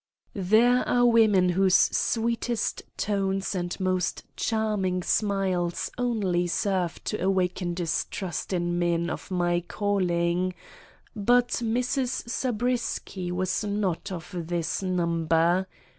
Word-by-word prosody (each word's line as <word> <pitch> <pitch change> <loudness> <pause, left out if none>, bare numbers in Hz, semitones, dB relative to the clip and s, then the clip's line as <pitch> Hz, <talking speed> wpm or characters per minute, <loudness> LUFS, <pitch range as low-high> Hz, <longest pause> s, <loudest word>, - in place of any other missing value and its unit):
There 220 +6 +4
are 245 0 +4
women 215 -6 +5
whose 190 +1 +3
sweetest 235 0 +1 0.2
tones 195 -1 -1
and 175 -1 -3
most 185 -2 -1
charming 210 -5 0
smiles 190 -5 0
only 205 -8 0
serve 180 -1 -1
to - - -3
awaken 185 -2 0
distrust 175 0 -3
in 175 -1 0
men 170 -1 0
of - - -6
my 175 -2 +1
calling; 180 -3 0 0.6
but 245 +4 +3
Mrs. 245 +2 -1
Zabriskie 235 -6 -2
was 185 +3 -1
not 200 -2 -2
of 175 +1 -7
this 170 0 -2
number. 170 0 +1
185 Hz, 105 wpm, -26 LUFS, 175-215 Hz, 0.6 s, women